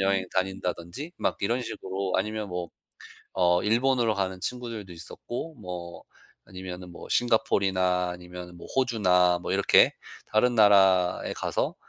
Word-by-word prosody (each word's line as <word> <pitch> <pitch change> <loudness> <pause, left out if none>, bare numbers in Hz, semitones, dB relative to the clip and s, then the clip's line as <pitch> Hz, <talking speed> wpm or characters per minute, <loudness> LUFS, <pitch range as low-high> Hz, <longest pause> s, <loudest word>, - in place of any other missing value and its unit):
여행 95 -1 +1
다닌다든지 95 - -3
막 - - 0
이런 120 +5 0
식으로. 95 -3 -4
아니면 105 +1 -2
뭐 90 -1 -4 0.7
어 90 -1 +3
일본으로 120 0 +2
가는 95 -1 -2
친구들도 115 -6 -5
있었고 120 - -7
뭐 90 -4 -8 0.4
아니면은 90 -1 -8
뭐 - - -10
싱가폴이나 95 -6 +2
아니면은 90 0 -10
뭐 - - -11
호주나 90 -9 +3
뭐 - - -2
이렇게 - - +5 0.4
다른 120 +3 +3
나라에 95 -4 +4
가서 - - -2
95 Hz, 310 characters per minute, -27 LUFS, 90-110 Hz, 0.7 s, 이렇게